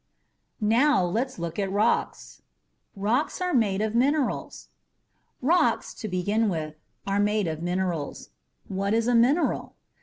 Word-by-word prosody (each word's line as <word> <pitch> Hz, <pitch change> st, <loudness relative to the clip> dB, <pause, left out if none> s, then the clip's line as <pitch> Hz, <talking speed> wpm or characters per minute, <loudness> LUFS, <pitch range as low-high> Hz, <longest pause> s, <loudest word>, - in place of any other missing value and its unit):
NOW 225 Hz, -1 st, +3 dB
LET'S 235 Hz, +9 st, -2 dB
LOOK 170 Hz, +2 st, -4 dB
AT 195 Hz, -1 st, -1 dB
ROCKS 210 Hz, +4 st, -1 dB, 0.5 s
ROCKS 220 Hz, -, 0 dB
ARE 360 Hz, -1 st, -1 dB
MADE 210 Hz, -5 st, +2 dB
OF 220 Hz, 0 st, -1 dB
MINERALS 275 Hz, +3 st, 0 dB, 0.7 s
Rocks, 340 Hz, +7 st, +2 dB
to 220 Hz, -, -6 dB
begin 205 Hz, +4 st, 0 dB
with, 155 Hz, -4 st, -3 dB, 0.3 s
are 200 Hz, +1 st, 0 dB
made 210 Hz, 0 st, +1 dB
of 160 Hz, -1 st, -3 dB
minerals. 175 Hz, -4 st, -3 dB, 0.4 s
What 200 Hz, +2 st, -1 dB
is 230 Hz, 0 st, +1 dB
a 245 Hz, -, +2 dB
mineral? 255 Hz, +8 st, +2 dB
210 Hz, 130 wpm, -26 LUFS, 190-240 Hz, 0.7 s, NOW